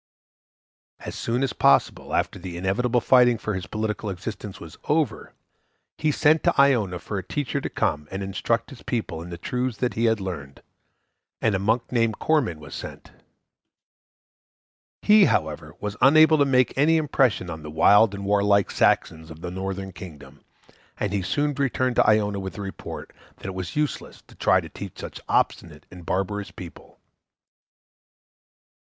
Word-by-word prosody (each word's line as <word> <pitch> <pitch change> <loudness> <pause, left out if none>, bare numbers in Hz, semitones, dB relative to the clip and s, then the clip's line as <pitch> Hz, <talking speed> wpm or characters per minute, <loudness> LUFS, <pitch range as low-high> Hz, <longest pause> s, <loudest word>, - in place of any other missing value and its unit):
As - - -6
soon 120 +3 -1
as 130 -5 -1
possible - - +2
after - - -1
the 90 -1 -7
inevitable 115 +7 0
fighting 125 -1 +5
for 110 0 -3
his 95 -1 -5
political 110 -1 -3
existence 100 +1 -6
was 80 -2 -11
over, 150 -6 -1 0.6
he 155 -1 0
sent 155 +2 +3
to - - +2
Iona 120 -10 +3
for 100 +4 -5
a - - -7
teacher 140 +7 -3
to - - -4
come 75 0 -1
and 95 +1 -4
instruct 115 +6 -1
his 130 - -12
people 95 -9 -3
in 85 - -9
the 85 - -7
truths 125 +6 -3 0.2
he 115 - 0
had 115 -2 +2
learned; 80 -8 -7 0.8
and 110 - +1
a 95 - 0
monk 110 +4 0
named 115 -3 +1
Corman 130 - 0
was 75 -3 -11
sent. - - -8 1.9
He, 210 -1 +7
however, 75 - -1
was 105 -1 -4
unable 155 +4 +6
to 140 - +5
make 130 -2 +2
any 155 +4 +4
impression 130 - +1
on 80 -1 -7
the 75 - -8
wild 100 +7 +5
and 100 0 -6
warlike 100 -1 +2
Saxons 80 0 +1
of 80 0 -11
the 90 - -5
northern 95 +1 -4
kingdom, 85 -5 -12 0.6
and 100 -1 -2
he 100 - 0
soon 145 +10 0
returned 130 -3 0
to - - +4
Iona 105 -2 +2
with 95 -1 -5
the - - -7
report 95 -1 -7 0.2
that - - -16
it 95 - -4
was 95 -2 -6
useless 150 -1 -3
to - - -19
try - - +3
to - - -10
teach - - -9
such - - -8
obstinate - - -1
and 90 -1 -11
barbarous 100 +2 -2
people. 90 -2 -12
105 Hz, 165 wpm, -24 LUFS, 95-125 Hz, 1.9 s, He